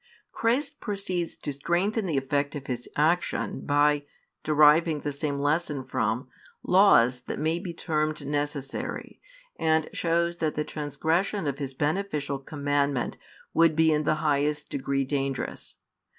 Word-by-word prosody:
Christ 240 +6 0
proceeds 185 -5 -2
to 145 - -4
strengthen 180 - 0
the 155 -5 0
effect 140 +2 0
of 140 -2 -6
His 125 -2 -4
action 165 +4 +1
by 145 0 +3 0.4
[deriving 155 +1 +5
the 145 - -2
same 140 0 -2
lesson 145 -1 0
from] 130 - -1 0.4
laws 130 - +5
that - - -3
may 160 +2 0
be 180 -1 -5
termed 155 -3 -2
necessary, 145 -1 -3 0.4
and 160 -1 +2
shows 170 0 0
that 155 -2 -1
the 150 - 0
transgression 160 +6 -1
of 140 -1 -2
His 135 -2 -4
beneficial 150 -3 -1
commandment 140 -2 -1 0.4
would 165 -2 +4
be 160 0 +4
in 150 - +2
the 155 - +2
highest 150 0 +1
degree 135 0 -1
dangerous. 135 -1 -3
150 Hz, 135 wpm, -27 LUFS, 140-165 Hz, 0.4 s, deriving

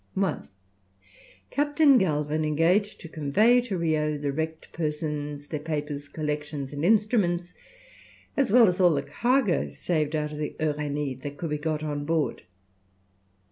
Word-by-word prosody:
1. 190 -4 -1 1.0
Captain 290 -1 +4
Galvin 155 -3 0
engaged 165 +7 +2
to 165 - -9
convey 195 - +3
to 225 -6 -3
Rio 155 -2 0
the 145 -1 -2
wrecked 160 +2 -4
persons, 150 -2 -3
their 150 0 -4
papers, 150 -2 -4
collections, 150 -2 -4
and 145 +1 -4
instruments, 190 -4 +2 0.8
as 270 -7 +1
well 235 -1 +7
as 180 0 0
all 175 -4 +5
the 140 - -1
cargo 240 - +1
saved 155 - -1
out 150 -1 -1
of 150 - -7
the 150 - -3
Uranie 145 -3 -2
that 145 +1 -6
could 165 -3 -4
be 150 - 0
got 155 0 -2
on 145 -1 -3
board. 160 0 -1
155 Hz, 145 wpm, -26 LUFS, 150-180 Hz, 1.0 s, well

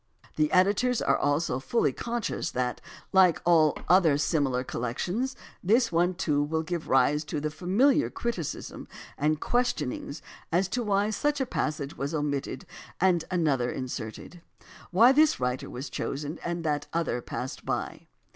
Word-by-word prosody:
The 155 -1 +1
editors 205 +7 +3
are - - +2
also 145 -2 0
fully 230 - +1
conscious 240 -1 -3
that, 125 -1 -2 0.3
like 185 -4 +5
all 160 -3 +4
other 170 -5 +5
similar 140 -4 +1
col 125 - -5
lections, 190 - -2 0.3
this 230 +5 +3
one, 175 +2 +2
too, 150 -5 +1
will 160 +2 -1
give 170 0 -4
rise 140 +3 +3
to 150 - -3
the 150 +1 -2
familiar 215 - +2
criticism 215 - -4 0.3
and 150 +1 +1
questionings 205 - -1 0.3
as 180 +3 +2
to 245 - -1
why 205 -1 +1
such 290 +7 0
a 265 - +1
passage 150 - -3
was 140 +4 -3
omitted 145 -3 -2 0.3
and 180 -2 +3
such - - -11
another 145 -9 +1
inserted; 125 +6 -6 0.5
why 225 +8 +6
this 305 +2 +4
writer 125 0 -2
was 130 +4 -6
chosen 145 +3 -4
and 170 0 -3
that 150 -2 -1
other 165 -7 -1
passed 125 +2 -6
by. - - -4
160 Hz, 155 wpm, -27 LUFS, 145-195 Hz, 0.5 s, why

